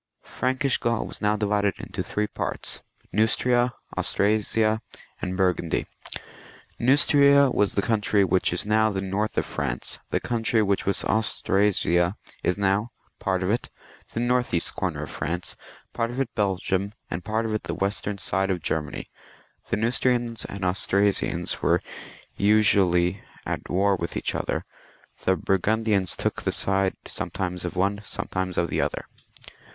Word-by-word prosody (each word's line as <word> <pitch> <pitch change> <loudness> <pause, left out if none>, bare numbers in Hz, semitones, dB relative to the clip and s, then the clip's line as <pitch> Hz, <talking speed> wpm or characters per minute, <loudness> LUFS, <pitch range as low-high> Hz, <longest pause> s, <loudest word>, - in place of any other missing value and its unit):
Frankish 130 +1 0
Gaul 115 -1 0
was - - -8
now 105 0 +2
divided 105 -2 +1
into - - -5
three 105 - -1
parts, - - -2 0.3
Neustria, 120 +4 +3 0.2
Austrasia, 110 +1 +1 0.4
and 90 0 -3
Burgundy. 90 -3 +1 0.9
Neustria 140 +1 +5
was 100 -2 +1
the 100 - +1
country 105 -3 +2
which 95 0 +2
is 105 - -1
now 110 +1 +3
the 100 -2 -2
north 100 +3 -2
of - - +2
France; 65 -5 -2
the - - +1
country 115 -1 +1
which 100 -1 0
was 100 - +3
Aus 110 +1 +1
trasia 95 -2 +2 0.3
is 90 - 0
now 100 +3 +1 0.3
part 95 -2 0
of 90 - +1
it 115 - -1 0.4
the - - -2
north 120 -4 +1
east 85 - +1
comer - - -2
of - - -7
France; 85 +4 -3 0.4
part 115 0 -1
of 120 +2 -5
it 130 -4 -1
Belgium, 95 -1 0 0.2
and 80 +2 -3
part 110 +1 -1
of 110 - -2
it 110 - -2
the - - -3
western 100 +1 -1
side 95 0 0
of 95 -2 0
Ger 80 - +1
many. 75 - -7 0.6
The - - +1
Neustrians 120 0 +1
and 100 -1 -5
Australians 100 +2 +1
were - - +3 0.6
usually 100 -3 +3 0.2
at - - -4
war 100 +2 +3
with 85 -2 -4
each - - -1
other; - - -2 0.6
the 95 - +4
Burgundians 100 0 +1
took - - -2
the - - 0
side 95 -1 +1
some - - -4
times 90 -1 -3
of 90 - -4
one, 100 +3 +1
sometimes 95 -2 -3
of 85 - +1
the - - +1
other. - - -2
100 Hz, 155 wpm, -25 LUFS, 95-110 Hz, 0.9 s, Neustria